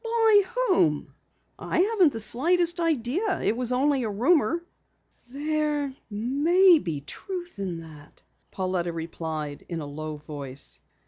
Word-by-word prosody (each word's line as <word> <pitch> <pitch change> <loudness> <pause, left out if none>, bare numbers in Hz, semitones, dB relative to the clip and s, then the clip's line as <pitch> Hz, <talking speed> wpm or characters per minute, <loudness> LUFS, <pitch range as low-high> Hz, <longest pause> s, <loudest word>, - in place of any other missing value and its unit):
"By 450 -2 +4 0.3
whom?" 150 - +2 0.5
"I - - 0
haven't 385 -6 +4
the 225 - -4
slightest 340 - +1
idea. 330 - 0
It 220 - +2
was 250 0 0
only 270 +2 +2
a 225 - -2
rumor." 270 - +2 0.7
"There 295 0 -1 0.2
may 300 - +4
be 160 - -4
truth 355 - -7
in 175 -4 -4
it," 150 -2 -15 0.3
Pauletta 185 -2 -2
replied 160 -3 -5
in 170 -2 -3
a 150 - -5
low 155 +1 -6
voice. 140 - -6
245 Hz, 130 wpm, -26 LUFS, -, 0.7 s, By